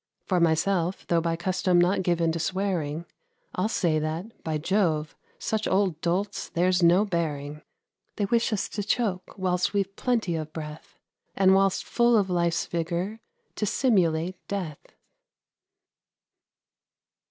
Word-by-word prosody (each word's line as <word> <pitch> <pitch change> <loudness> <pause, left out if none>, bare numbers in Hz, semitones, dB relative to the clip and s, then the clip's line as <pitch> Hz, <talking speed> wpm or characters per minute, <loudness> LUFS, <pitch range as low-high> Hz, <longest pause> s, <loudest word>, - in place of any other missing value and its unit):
For 185 -2 +1
myself, 170 +2 +1
though 170 -1 +3
by 165 0 0
custom 180 +1 +1
not 180 +2 +3
given 170 -2 +1
to 165 - -3
swearing, 170 -3 -2 0.5
I'll 185 +4 0
say 165 -7 +1
that, 160 +8 -5
by 160 -1 -1
Jove, 160 -3 0 0.2
such 220 -1 -2
old 185 -4 +1
dolts 185 +4 -1
there's 180 +1 +2
no 175 +4 +5
bearing; 150 -5 -3 0.5
They 205 - 0
wish 230 +3 +1
us 215 - -1
to 210 - -3
choke 200 -4 -1
whilst 180 -1 0
we've 195 -1 0
plenty 230 -9 0
of 155 -1 -5
breath, 150 -1 -8 0.4
And 190 -1 +5
whilst 195 0 +3
full 235 -1 +3
of 195 -3 +1
life's 170 -1 +1
vigour 175 +6 -3 0.4
to 210 - -1
simulate 185 -8 +1
death. 180 -7 -5
180 Hz, 135 wpm, -26 LUFS, 165-195 Hz, 0.5 s, no